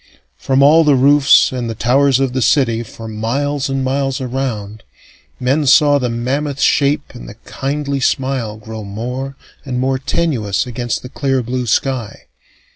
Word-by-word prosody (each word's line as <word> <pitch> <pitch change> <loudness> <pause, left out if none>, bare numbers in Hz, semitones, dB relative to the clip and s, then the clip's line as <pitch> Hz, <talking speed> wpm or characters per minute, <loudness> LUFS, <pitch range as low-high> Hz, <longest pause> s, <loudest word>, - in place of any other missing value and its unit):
From 135 - +1
all 160 +3 +6
the 150 -3 +4
roofs 140 +2 +5
and 125 -2 -4
the 115 - -4
towers 130 +3 +2
of 135 -2 0
the 130 - -1
city, 115 -3 +2
for 115 0 -10
miles 135 +6 -2
and 135 0 -1
miles 135 0 -1
around, 120 -5 -4 0.6
men 135 +4 0
saw 145 +1 +5
the 125 -2 -1
mammoth 135 +5 -2
shape 145 0 +1
and 120 - -10
the 100 - -11
kindly 140 0 -3
smile 130 -4 -1
grow 110 0 -8
more 125 +7 -5 0.3
and 125 -3 -3
more 130 +1 0
tenuous 130 - -1
against 120 -1 -4
the 125 - -8
clear 135 -2 -1
blue 125 +1 -3
sky. 120 -1 -1
130 Hz, 160 wpm, -17 LUFS, 120-140 Hz, 0.6 s, all